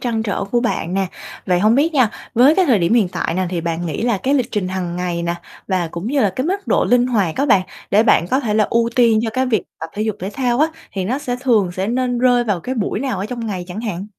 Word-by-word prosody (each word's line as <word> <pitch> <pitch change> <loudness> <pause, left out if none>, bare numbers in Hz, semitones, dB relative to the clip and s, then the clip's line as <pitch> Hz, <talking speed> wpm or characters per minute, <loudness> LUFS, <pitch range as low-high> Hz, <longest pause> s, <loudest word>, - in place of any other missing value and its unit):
trăn 230 -3 -1
trở 200 -2 -2
của 240 +4 0
bạn 190 -7 -2
nè. 195 -1 +1 0.4
Vậy 180 -1 +2
hông 215 +3 +4
biết 310 +5 +2
nha, 250 -6 +4 0.2
với 265 +7 +6
cái 380 - +3
thời 235 -7 +4
điểm 175 +7 +2
hiện 210 -7 +3
tại 165 - -3
nè 185 0 0
thì 175 -2 -2
bạn 170 +1 -3
nghĩ 160 - -3
là 235 -5 +1
cái 270 +7 0
lịch 250 -3 0
trình 195 -4 -1
hàng 180 -2 -3
ngày 175 -1 -2
nè, 170 0 -1 0.3
và 180 -3 0
cũng 170 +5 -6
như 275 +2 +1
là 205 - +3
cái 260 +4 -1
mức 395 +2 -2
độ - - +2
linh 245 0 +3
hoạt 200 -10 0
á, 280 - +1
bạn 195 -7 +4 0.3
để 210 +2 +5
bạn 175 -6 +3
có 265 - +2
thể 215 -5 -1
là 215 -1 +4
ưu 235 0 +2
tiên 230 -3 +5
cho 225 - -1
cái 260 +2 0
việc 220 -6 +1 0.2
tập 160 - -5
thể 210 - -2
dục 215 -2 -2
thể 190 +2 -4
thao 250 -2 0
á 315 - +4 0.2
thì 190 -2 -3
nó 255 +8 -1
sẽ 250 -4 -3
thường 215 -9 +2
sẽ 190 +2 -2
nên 245 +1 0
rơi 245 -1 +3
vào 200 -6 -1
cái 260 +7 -4
buổi 210 -2 -2
nào 255 -7 -2
ở 195 - -3
trong 235 -1 -5
ngày 185 -4 -4
chẳng 205 +5 -5
hạn? 200 -4 -4
220 Hz, 290 wpm, -19 LUFS, 185-245 Hz, 0.4 s, với